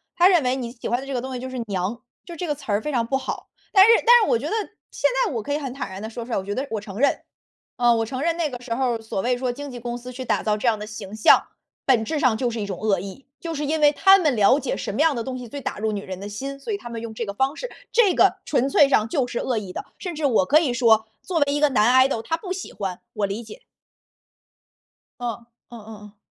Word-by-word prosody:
他 350 - +6
认 355 -6 +4
为 250 +1 +1
你 245 -3 -4
喜 240 - -7
欢 240 - +1
的 270 - -8
这 275 - -5
个 245 - -1
东 260 +1 -6
西 250 - -4
就 260 +1 -6
是 255 -1 -5
娘， 200 +4 -3 0.2
就 345 - -8
这 350 +2 -4
个 295 - -1
词 275 -6 -7
儿 205 +1 +1
非 300 - -3
常 240 -4 +1
不 270 +3 0
好。 265 - -6 0.2
但 385 -1 +8
是 - - +4
但 - - -6 0.2
是 - - 0
我 230 - +3
觉 270 - -6
得 - - -2 0.4
现 - - +1 0.2
在 - - -2
我 225 -3 -3
可 285 - -3
以 - - +1
很 270 -4 -5
坦 265 -7 -5
然 190 +1 -7
地 220 - -5
说 230 0 -7
出 245 - -10
来， - - +1
我 190 - -2
觉 200 +1 -4
得 270 +2 -3
我 215 -2 -2
承 200 -2 -9
认 280 - +2 0.6
呃， 240 -1 +4
我 225 - 0
承 255 +3 -5
认 330 +2 +1
那 330 -3 0
个 245 -3 -7
时 245 -2 -5
候， 240 -1 0
所 220 -3 -4
谓 245 +2 0
说 250 0 -1
经 285 +3 -7
纪 250 -2 -8
公 240 0 -4
司 245 +1 -9
去 255 +1 -7
打 - - +1
造 210 -1 0
这 235 - -2
样 220 -2 +2
的 210 - -6
形 215 -2 -8
象， 220 - +6 0.4
本 250 -5 +3
质 305 +7 -2
上 255 -5 +3
就 245 +2 0
是 230 -1 -4
一 205 - -2
种 190 -3 -5
恶 210 -4 +1
意， 200 +9 -9
就 335 -1 -5
是 295 -1 -3
因 315 +1 0
为 295 -1 +6
他 385 +6 +6
们 305 -8 +1
了 225 +6 +5
解 - - -2
什 - - -4
么 215 - -4
样 315 -2 +3
的 235 - -2
东 255 +2 -5
西 250 -1 -8
最 280 +5 -7
打 - - -4
入 215 +1 -1
女 205 -1 -3
人 185 -2 -7
的 200 - -6
心， 270 +7 -6
所 420 - -4
以 - - -1
他 240 - -10
们 230 -1 -5
用 230 -1 -6
这 225 - -4
个 200 - -4
方 265 +5 +1
式。 - - -6 0.2
这 425 -6 +4
个 - - +4
纯 270 -2 +1
粹 275 0 +5
上 220 -5 +3
就 245 +2 0
是 240 - -5
恶 240 -3 -1
意 195 -3 -8
的， - - -6
甚 355 -3 -5
至 300 -1 -2
我 225 -9 +3
可 305 +2 +6
以 280 -7 0
说， 225 -3 +4 0.2
作 360 - -3
为 285 0 +2
一 290 - 0
个 295 - +4
男 255 +2 +5
idol 225 -4 -2
他 325 - -1
不 365 +2 -8
喜 370 0 -5
欢， 190 -3 -4
我 210 -2 0
理 200 +4 -5
解。 365 - -12 1.6
哦， 235 -1 -5 0.2
嗯 235 - -10
嗯 210 - -14 0.2
嗯。 205 0 -16
245 Hz, 335 characters per minute, -23 LUFS, 220-285 Hz, 1.6 s, 但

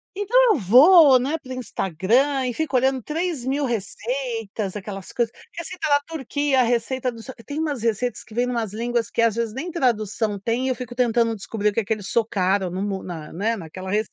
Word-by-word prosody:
Então 410 +4 -1
eu 420 - +3
vou, 270 - +7
né, 280 +6 -1
pro 260 -4 -8
Instagram 250 - 0
e 250 - -1
fico 300 0 -1
olhando 265 0 +2
3 315 -2 -3
mil 280 +2 0
receitas. 225 -3 -3
Aquelas 195 -1 -7
coisas: 235 -2 -1 0.2
receita 335 -1 -4
da 285 -1 +4
Turquia, 285 -3 0
receita 245 +2 0
do 230 -2 -11
só 260 - -8
tem 290 +1 -5
umas 295 -7 -2
receitas 230 +1 -1
que 215 - -15
vêm 245 - +2
em - - -2
umas 225 -4 -2
línguas 235 0 -1
que, 230 - 0
às 230 -2 +2
vezes, 230 -1 -2
nem 330 +7 -4
tradução 220 - 0
têm 230 +6 -1
e - - +1
eu 260 - +1
fico 250 -1 -7
tentando 235 -2 +2
descobrir 210 0 -1
o - - -11
que 230 - 0
que 220 - -1
eles 205 -3 -8
socaram 195 -4 +1
no 185 +2 -3
mo 195 -2 -3
na 160 -4 -7
né, 220 +7 -1
naquela 185 +1 -8
receita. 210 +1 -1
235 Hz, 210 wpm, -23 LUFS, 210-265 Hz, 0.2 s, vou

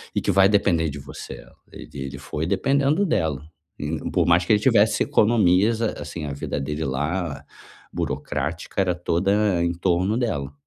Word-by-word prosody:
e - - +1
que - - 0
vai 95 0 +5
depender 85 -6 +2
de 70 - -7
você, 70 - -9 0.3
e - - -11
ele 70 0 -6
foi 75 +3 -4
dependendo 140 - +1
dela, 80 - -1 0.4
in 75 +2 -3
por - - +2
mais 85 +1 +4
que 110 - +3
ele 105 - +4
tivesse 110 -2 +3
economias, 105 0 +3
ah, 115 - 0
assim, 80 -3 -6
a 70 - -4
vida 70 +1 -4
dele 75 +3 -3
lá 75 +7 -2 0.5
burocrática 80 +8 -3
era 90 -2 +1
toda 95 +2 +1
em 85 0 0
torno 90 +5 0
dela. 70 - -2
85 Hz, 170 wpm, -23 LUFS, 75-105 Hz, 0.5 s, vai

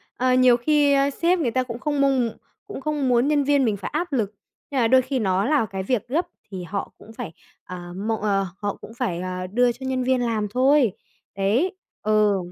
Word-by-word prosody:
ờ, 255 0 +2
nhiều 255 -1 +5
khi, 290 +2 +3
ờ, 275 0 +3
sếp 345 +5 +1
người 260 -8 0
ta 255 +2 +1
cũng 235 -1 -7
không 290 +1 -1
mong 270 -3 +3
m - - -5 0.4
cũng 410 - -7
không 295 -1 -1
muốn 245 +2 +3
nhân 295 -1 +2
viên 280 -1 +3
mình 215 -3 0
phải 195 - -5
áp 350 -3 -2
lực. 215 -5 0 0.4
Nhưng 265 - +1
mà 230 - +4
đôi 260 +2 +5
khi 260 +1 -2
nó 195 -1 +1
là 285 -4 +2
cái 190 -2 -5
việc 245 +1 -1
gấp, 330 +7 0 0.2
thì 185 -2 -5
họ 195 +3 -4
cũng 225 - -14
phải, 220 -8 -7 0.3
ờ, 175 -1 -8
mọ 220 +4 -1
ờ, 195 -2 +1
họ 205 -1 -3
cũng 225 - -10
phải, 225 -8 -2
ờ, 185 0 -4
đưa 245 +5 +2
cho 265 +2 -8
nhân 260 -1 -1
viên 255 0 +2
làm 220 -3 0
thôi. 260 0 +3 0.4
Đấy, 235 - +1 0.3
ừ. 210 -2 +3
245 Hz, 230 wpm, -23 LUFS, 205-275 Hz, 0.4 s, nhiều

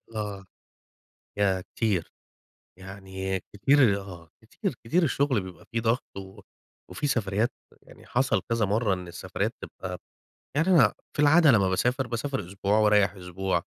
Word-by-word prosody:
آه، 100 -3 -4 0.9
ياه 95 -2 +2
كتير! 100 -2 -2 0.7
يعني 95 0 -5
كتير، 105 -1 +4
آه، 85 -4 -11
كتير، - - -4
كتير 170 +11 +2
الشغل 140 -6 +2
بيبقي 90 -2 -11
في 115 - 0
ضغط 115 0 -1
و 95 +1 -10 0.5
وفي 95 +11 -3
سفريات، 110 -3 0 0.3
يعني - - -17
حصل 135 +2 +1
كذا 115 -1 +2
مرّة 105 0 +1
إن 90 -1 -8
السفريات 85 0 -3
تبقي - - -7 0.6
يعني 155 +5 +2
أنا 150 - +6 0.2
في 145 - +1
العادة 150 0 +6
لمّا 100 -4 +3
باسافر، 125 +7 0
باسافر 135 +4 -2
أسبوع 100 +2 0
وأريح 105 -3 +4
أسبوع، 95 +1 -2
105 Hz, 140 wpm, -27 LUFS, 95-125 Hz, 0.9 s, أنا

